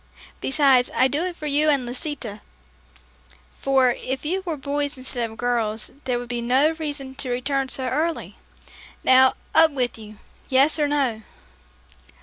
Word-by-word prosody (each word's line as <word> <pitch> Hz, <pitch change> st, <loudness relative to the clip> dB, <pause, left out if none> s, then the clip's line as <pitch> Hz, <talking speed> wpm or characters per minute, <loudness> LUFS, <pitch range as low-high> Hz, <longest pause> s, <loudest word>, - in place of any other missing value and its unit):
Besides, 270 Hz, -3 st, +3 dB
I 260 Hz, -, +4 dB
do 285 Hz, +5 st, -1 dB
it 360 Hz, -1 st, -4 dB
for 305 Hz, -, -9 dB
you 300 Hz, +1 st, +2 dB
and 275 Hz, -4 st, +2 dB
Lisita, 245 Hz, -4 st, -5 dB, 1.2 s
for 265 Hz, -2 st, +3 dB
if 260 Hz, +3 st, -5 dB
you 370 Hz, +5 st, -1 dB
were 325 Hz, -3 st, -2 dB
boys 285 Hz, 0 st, -2 dB
instead 245 Hz, -2 st, -2 dB
of 220 Hz, -, -13 dB
girls, 225 Hz, -3 st, -1 dB
there 250 Hz, -2 st, 0 dB
would 245 Hz, 0 st, -6 dB
be 240 Hz, 0 st, -3 dB
no 260 Hz, +6 st, +3 dB
reason 290 Hz, -4 st, -5 dB
to 265 Hz, -1 st, -3 dB
return 265 Hz, +2 st, -1 dB
so 260 Hz, -, 0 dB
early. 315 Hz, +6 st, -2 dB, 0.7 s
Now, 260 Hz, 0 st, +6 dB, 0.2 s
up 320 Hz, 0 st, +7 dB
with 250 Hz, -5 st, -2 dB
you. 215 Hz, -1 st, -11 dB, 0.3 s
Yes, 275 Hz, +4 st, +3 dB
or 295 Hz, -, +2 dB
no." 270 Hz, -7 st, 0 dB
265 Hz, 155 wpm, -23 LUFS, 245-295 Hz, 1.2 s, up